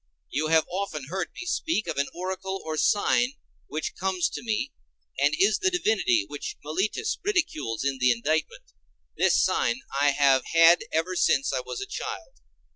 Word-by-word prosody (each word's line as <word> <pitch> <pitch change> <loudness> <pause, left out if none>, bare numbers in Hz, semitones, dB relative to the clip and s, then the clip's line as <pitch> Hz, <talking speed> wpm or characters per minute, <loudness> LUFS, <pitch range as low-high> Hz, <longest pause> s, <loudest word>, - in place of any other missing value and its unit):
You 155 +3 0
have 160 0 +4
often 175 -7 -4
heard 185 -1 -2
me 380 - -7
speak 325 -9 -1
of - - -4
an 140 - +1
oracle 190 +2 -4
or 160 0 -3
sign 240 - +2 0.3
which 155 +2 -4
comes 185 -2 0
to - - -6
me, 230 +5 -2 0.5
and - - +3
is 400 +2 +3
the 390 -2 +2
divinity 215 - +1
which 145 - -6
Meletus 190 - -1
ridicules 330 - -1
in 135 -1 -1
the 125 0 +4
indictment. 155 - 0 0.5
This - - +3
sign 250 - +1 0.2
I 145 - +5
have 140 -2 +3
had 165 +1 +6
ever 165 +3 0
since 135 -5 +2
I 130 - 0
was 130 - -6
a - - -3
child. 420 +4 -6
175 Hz, 170 wpm, -26 LUFS, 145-230 Hz, 0.5 s, had